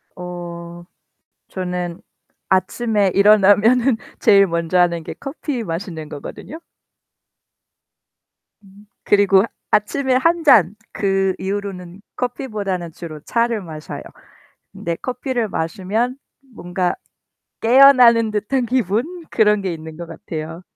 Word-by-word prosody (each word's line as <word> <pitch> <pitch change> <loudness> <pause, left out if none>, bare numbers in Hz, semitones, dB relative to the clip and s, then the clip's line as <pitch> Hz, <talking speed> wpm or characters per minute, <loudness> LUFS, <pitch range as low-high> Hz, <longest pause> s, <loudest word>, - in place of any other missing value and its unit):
어. 175 -1 -8 0.6
저는 180 -2 -4 0.5
아침에 200 +2 +1
일어나면은 215 +5 +5 0.2
제일 195 -1 +6
먼저 170 +1 -1
하는 170 -2 +2
게 - - -7
커피 275 -3 -4
마시는 165 -4 -6
거거든요. 150 - -9 2.5
그리고 200 -1 +4 0.3
아침에 260 +5 +1
1 330 +5 +2
잔. 210 - +5 0.2
그 195 -1 0
이후로는 190 -1 -5
커피보다는 210 -9 -4
주로 155 -2 -9
차를 230 +3 0
마셔요. 155 -3 -8 0.7
근데 170 0 -4
커피를 250 - -3
마시면 200 +9 -2 0.4
뭔가 180 -1 -2 0.7
깨어나는 240 -2 +6
듯한 235 +5 -1
기분 255 - -1
그런 210 -2 +3
게 185 -3 -2
있는 160 0 -10
거 170 +1 -7
같아요. 160 +1 -7
200 Hz, 225 characters per minute, -19 LUFS, 175-235 Hz, 2.5 s, 제일